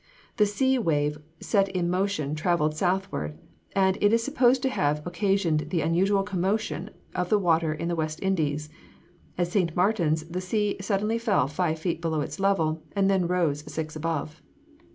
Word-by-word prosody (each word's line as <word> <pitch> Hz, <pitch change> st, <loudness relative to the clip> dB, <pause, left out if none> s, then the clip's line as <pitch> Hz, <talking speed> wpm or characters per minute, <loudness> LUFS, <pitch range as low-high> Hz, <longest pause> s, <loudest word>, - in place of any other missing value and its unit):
The 210 Hz, -, +4 dB
sea 260 Hz, +5 st, +1 dB
wave 150 Hz, -6 st, 0 dB, 0.2 s
set 195 Hz, -3 st, +2 dB
in 180 Hz, -2 st, -1 dB
motion 180 Hz, -5 st, 0 dB
travelled 155 Hz, -1 st, +1 dB
southward, 180 Hz, -, -1 dB, 0.4 s
and 190 Hz, -1 st, +2 dB
it 205 Hz, -, +5 dB
is 230 Hz, 0 st, +3 dB
supposed 255 Hz, -2 st, +3 dB
to 265 Hz, -, +2 dB
have 150 Hz, -, 0 dB
occasioned 175 Hz, -5 st, 0 dB
the 165 Hz, -1 st, 0 dB
unusual 190 Hz, +5 st, +2 dB
commotion 195 Hz, -2 st, -1 dB, 0.2 s
of 180 Hz, -1 st, -2 dB
the 210 Hz, -, +4 dB
water 165 Hz, -4 st, +2 dB
in 155 Hz, +2 st, -3 dB
the 170 Hz, -, 0 dB
West 155 Hz, -1 st, -2 dB
Indies. 155 Hz, -6 st, 0 dB, 0.7 s
At 175 Hz, -1 st, 0 dB
St. 175 Hz, -4 st, 0 dB
Martin's 175 Hz, -5 st, +2 dB
the 180 Hz, +2 st, -4 dB
sea 210 Hz, +2 st, 0 dB
suddenly 210 Hz, +3 st, 0 dB
fell 210 Hz, -, +2 dB
five 160 Hz, +2 st, -1 dB
feet 165 Hz, 0 st, -2 dB
below 160 Hz, -2 st, 0 dB
its 145 Hz, -, -5 dB
level, 165 Hz, -5 st, +1 dB
and 195 Hz, 0 st, +3 dB
then 185 Hz, -3 st, +2 dB
rose 170 Hz, -5 st, +1 dB
six 155 Hz, 0 st, -4 dB
above. 155 Hz, -1 st, -3 dB
180 Hz, 170 wpm, -26 LUFS, 155-200 Hz, 0.7 s, it